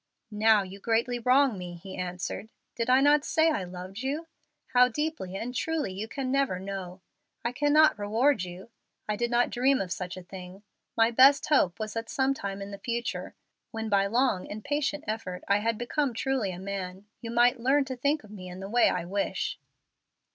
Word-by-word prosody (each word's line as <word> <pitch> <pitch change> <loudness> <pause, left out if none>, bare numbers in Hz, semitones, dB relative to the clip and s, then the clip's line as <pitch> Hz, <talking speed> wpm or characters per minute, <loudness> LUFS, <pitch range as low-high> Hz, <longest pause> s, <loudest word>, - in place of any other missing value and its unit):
"Now 215 0 +4
you 190 +1 -10
greatly 235 +3 0
wrong 255 -2 +3
me," 175 -1 -6
he 190 +3 -9
answered. 180 +4 -4 0.2
"Did 230 0 -2
I 260 +1 +6
not 290 +1 +5
say 320 +1 +3
I 250 - -1
loved 180 +3 -8
you? 285 +5 -2 0.5
How 250 0 +7
deeply 300 - -3
and 235 +5 -4
truly 310 -7 -1
you 205 +4 -5
can 260 +2 -3
never 275 -9 +1
know. 190 -1 -6 0.4
I 235 - +1
cannot 290 +1 +4
reward 225 +5 +2
you. 180 +5 -9 0.4
I 210 - 0
did 240 +2 -1
not 240 0 +2
dream 260 +2 +3
of 185 -2 -3
such 180 0 -4
a 185 - -8
thing. 185 +2 -10 0.3
My 225 +1 +4
best 270 +4 +6
hope 230 - +3
was 215 -1 -4
that 225 0 -4
some 265 0 +1
time 200 -5 -5
in 200 - -8
the 200 - -8
future, 235 +3 -3 0.3
when 225 0 -4
by 200 -1 +3
long 230 -3 +1
and 210 +1 -7
patient 295 0 -1
effort 200 -5 -4
I 200 +1 +3
had 225 +1 0
become 245 +2 -1
truly 255 -5 0
a 175 - -7
man, 190 0 -5 0.2
you 230 - -6
might 240 +2 +3
learn 270 +4 +3
to 260 -1 -5
think 285 +3 0
of 210 - -14
me 185 -3 -8
in 180 +1 -8
the 195 +1 -6
way 240 +1 +5
I - - -2
wish." 200 +3 -2
225 Hz, 200 wpm, -28 LUFS, 195-265 Hz, 0.5 s, How